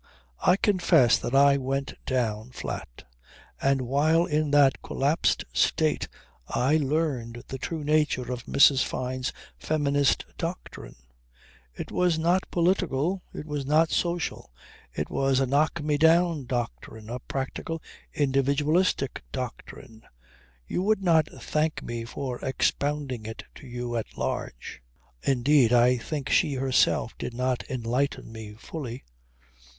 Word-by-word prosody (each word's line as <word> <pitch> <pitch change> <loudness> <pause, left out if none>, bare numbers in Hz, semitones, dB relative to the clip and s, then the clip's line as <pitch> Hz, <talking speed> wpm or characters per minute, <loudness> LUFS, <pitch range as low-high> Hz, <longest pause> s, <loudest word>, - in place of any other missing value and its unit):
I 180 - +4
confess 175 - +4
that 120 - -3
I 140 0 +6
went 135 +1 -2
down 115 -3 -1
flat. - - -6 0.6
And 135 -1 +2
while 155 +6 +3
in 155 -3 0
that 140 -2 +4
collapsed 145 +4 0
state - - +1 0.4
I 140 +5 +2
learned 135 -6 -1
the 135 - -5
true 160 +2 -4
nature 145 -4 +1
of 125 -2 -5
Mrs. 140 -1 +5
Fyne's 130 0 -3 0.3
feminist 145 - +1
doctrine. 170 +2 -6 0.8
It - - -7
was 180 -3 +2
not 175 +4 +1
political, 175 -1 +1
it - - -7
was 150 -2 -3
not 155 +4 +3
social. 170 - -2 0.4
It - - -4
was 135 -1 +2
a 135 - +2
knock 150 +4 +1
me 150 -1 0
down 165 -2 +4
doctrine 115 -3 -4
a 120 +2 -5
practical 135 +6 -4 0.3
individualistic 140 +2 +1
doctrine. 125 -2 -7 0.6
You 175 - -2
would 205 +1 +1
not 160 -4 +4
thank 155 +1 -2
me 115 -1 -5
for 125 +1 -5
expounding 135 -3 -1
it 110 - -7
to 140 - -13
you 120 -1 -4
at 115 - -6
large. - - -4 0.4
Indeed 135 -1 +3
I 125 +1 +5
think 140 +3 -4
that - - +1
she 145 - +3
herself 130 -1 +2
did 120 - -5
not 125 0 -1
enlighten 125 +1 -2
me 110 -2 -8
fully. 130 -1 -7
140 Hz, 130 wpm, -26 LUFS, 125-155 Hz, 0.8 s, I